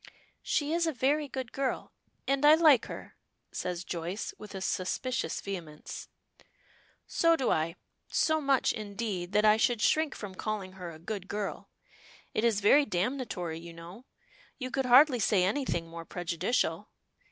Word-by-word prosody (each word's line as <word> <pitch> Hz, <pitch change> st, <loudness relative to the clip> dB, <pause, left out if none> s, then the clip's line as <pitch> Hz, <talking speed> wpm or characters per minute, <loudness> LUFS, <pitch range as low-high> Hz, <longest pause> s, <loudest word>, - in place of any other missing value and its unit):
"She 295 Hz, 0 st, 0 dB
is 340 Hz, 0 st, +2 dB
a -, -, +2 dB
very 285 Hz, +4 st, +1 dB
good 260 Hz, -2 st, -5 dB
girl, 270 Hz, -1 st, -2 dB, 0.3 s
and 275 Hz, +1 st, +1 dB
I 300 Hz, +1 st, +9 dB
like 310 Hz, -7 st, +5 dB
her," -, -, -9 dB, 0.3 s
says 180 Hz, -1 st, -3 dB
Joyce, 175 Hz, +4 st, -4 dB
with 210 Hz, -1 st, -9 dB
a -, -, -3 dB
suspicious 210 Hz, +8 st, -1 dB
vehemence. 165 Hz, -6 st, -7 dB, 1.0 s
"So 330 Hz, 0 st, +3 dB
do 265 Hz, -6 st, 0 dB
I; 160 Hz, +2 st, 0 dB, 0.3 s
so 315 Hz, -1 st, +2 dB
much, 275 Hz, -2 st, +2 dB
indeed, 205 Hz, -4 st, -4 dB
that 210 Hz, +1 st, +4 dB
I 215 Hz, 0 st, +6 dB
should 235 Hz, +1 st, +2 dB
shrink 310 Hz, +5 st, +2 dB
from 205 Hz, -3 st, -7 dB
calling 200 Hz, -1 st, -4 dB
her 185 Hz, -2 st, -8 dB
a 160 Hz, -, -10 dB
good 190 Hz, +3 st, -6 dB
girl. 205 Hz, -1 st, -4 dB, 0.6 s
It 215 Hz, -, 0 dB
is 225 Hz, -3 st, +2 dB
very 280 Hz, +9 st, +6 dB
damnatory, 185 Hz, -4 st, -2 dB
you 170 Hz, 0 st, -10 dB
know. 170 Hz, +9 st, -11 dB, 0.5 s
You 255 Hz, -1 st, -5 dB
could 265 Hz, 0 st, 0 dB
hardly 255 Hz, +1 st, +7 dB
say 200 Hz, -3 st, +3 dB
anything 190 Hz, -5 st, 0 dB
more 165 Hz, 0 st, -8 dB
prejudicial. 175 Hz, +7 st, -1 dB
215 Hz, 155 wpm, -30 LUFS, 180-265 Hz, 1.0 s, I